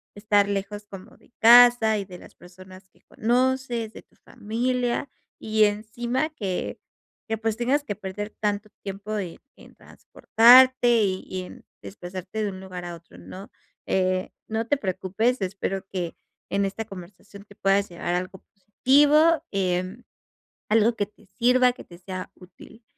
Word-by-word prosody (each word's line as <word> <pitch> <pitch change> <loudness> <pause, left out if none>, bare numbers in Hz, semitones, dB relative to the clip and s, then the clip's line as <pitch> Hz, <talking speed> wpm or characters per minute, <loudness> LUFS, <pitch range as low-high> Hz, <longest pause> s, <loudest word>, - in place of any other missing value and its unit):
estar 205 -1 +2
lejos 205 +1 -4
como 195 +6 -12
de - - -26
casa 235 -1 +7
y 195 - -5
de 180 -2 -11
las - - -15
personas 185 +1 -15
que - - -31
conoces, 245 -1 -1
de - - -11
tu - - -34
familia 245 +3 -2 0.3
y 215 0 +2
encima 235 +7 -2
que 195 - -4 0.5
que, 225 - -1
pues, 225 0 -2
tengas 265 +5 +1
que 205 -8 -5
perder 205 +1 -6
tanto 210 0 -2 0.2
tiempo 205 +2 -5
en 180 -4 -5 0.2
en - - -18
transportarte 245 -1 +4
y 190 -1 -1
y 185 0 -5
en 180 - -12 0.2
desplazarte 185 +2 -7
de 205 - -1
un 190 -1 -8
lugar 185 -2 -8
a 175 -1 -6
otro, 165 - -17
¿no? 185 - -11 0.4
Eh, 185 0 0 0.2
no 225 +1 -2
te 290 - +2
preocupes, 215 +4 -1
espero 195 0 -3
que 175 -3 -4 0.3
en 200 0 0
esta 200 +3 -4
conversación 195 +1 -12
te 205 - -18
puedas 195 +1 +1
llevar 175 0 -3
algo 185 +1 -4
positivo, 290 - +3
em, 185 +3 -2 0.7
algo 225 +2 +3
que 205 -3 -2
te 210 0 -25
sirva, 250 +5 +3
que 250 - -12
te 175 -1 -15
sea 185 0 -7
útil. 190 +5 -17
205 Hz, 155 wpm, -24 LUFS, 190-235 Hz, 0.7 s, casa